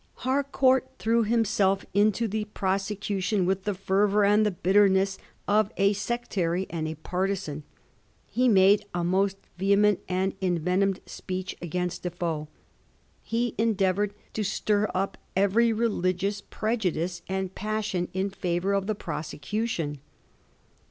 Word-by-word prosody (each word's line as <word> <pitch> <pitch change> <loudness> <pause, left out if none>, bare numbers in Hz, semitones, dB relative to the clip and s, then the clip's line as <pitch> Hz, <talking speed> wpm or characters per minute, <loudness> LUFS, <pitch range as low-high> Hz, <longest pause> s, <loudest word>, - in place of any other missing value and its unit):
Harcourt 265 -1 +2
threw 230 +1 +2
himself 210 -3 +2
into 210 +3 +3
the 215 +1 -2
prosecution 195 -1 -1
with 190 +1 0
the 205 -2 -1
fervour 200 +2 +2
and 210 +2 +4
the 210 - +3
bitter 195 +2 +4
ness 190 0 +1 0.3
of 210 +1 +3
a 200 +1 +4
sectary 195 -4 -1
and 160 -2 -2
a 160 - -4
partisan. 180 -2 -2 0.6
He 255 +1 +1
made 200 0 +5
a 175 - 0
most 190 +2 +1 0.2
vehement 200 +1 +4
and 185 +1 0
envenomed 185 +2 +1
speech 185 0 -5
against 180 +1 -3
Defoe; 170 -3 -3 0.7
he 235 +1 -1
endeavoured 205 -2 +1 0.2
to 215 - -1
stir 210 +1 +1
up 195 +1 -1 0.2
every 205 +5 +3
religious 200 -3 0
prejudice 185 -7 -2
and 190 -1 -2
passion 210 -4 -2
in 190 +2 -1
favour 180 +1 -1
of 195 0 0
the 215 - 0
prosecution. 165 0 -3
195 Hz, 125 wpm, -27 LUFS, 185-210 Hz, 0.7 s, made